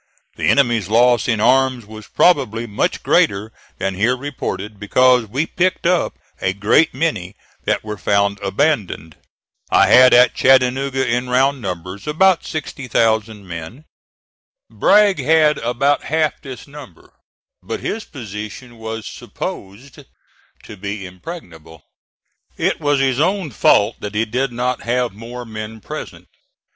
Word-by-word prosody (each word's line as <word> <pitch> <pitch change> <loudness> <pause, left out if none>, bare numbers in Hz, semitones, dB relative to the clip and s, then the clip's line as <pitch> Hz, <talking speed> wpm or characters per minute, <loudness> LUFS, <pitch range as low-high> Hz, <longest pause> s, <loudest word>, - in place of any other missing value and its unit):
The - - -2
enemy's 120 -8 +2
loss 120 +2 +3
in 115 -4 +1
arms 130 0 +2
was 110 0 -11
probably 125 -10 +2
much 105 -3 -2
greater 100 +3 +2 0.3
than 95 - -2
here 115 +7 +1
reported, 110 -7 -5
because 125 +3 +3
we 135 +9 -1
picked 180 +2 -1
up 180 0 +1 0.2
a 95 - 0
great 105 +11 +3
many 110 - -2 0.3
that - - 0
were 105 -1 -6
found 100 0 +1
abandoned. 100 - -1 0.5
I - - +4
had 130 0 +7
at 125 0 +6
Chattanooga, 130 +1 +2
in 125 +2 -1
round 135 +2 +2
numbers, 90 - -6
about 180 +4 +3
60,000 110 - -2
men. 85 - -8 0.9
Bragg 205 -2 +4
had 155 -1 +3
about 130 +4 0
half 155 0 -1
this 130 -3 -9
number, 140 - -14 0.5
but - - -5
his 220 +1 -3
position 110 0 -9
was 110 0 -6
supposed 105 +8 -8 0.6
to 105 - -11
be 100 +1 -5
impregnable. 90 - -11 0.7
It - - 0
was 145 -1 +1
his 135 -1 +1
own 185 -1 0
fault 105 0 +3
that 105 0 -7
he 110 +2 +1
did 125 +4 -2
not 125 +1 -2
have 125 -1 -1
more 120 +4 -8
men 110 0 -7
present. - - -8
120 Hz, 135 wpm, -19 LUFS, 105-135 Hz, 0.9 s, had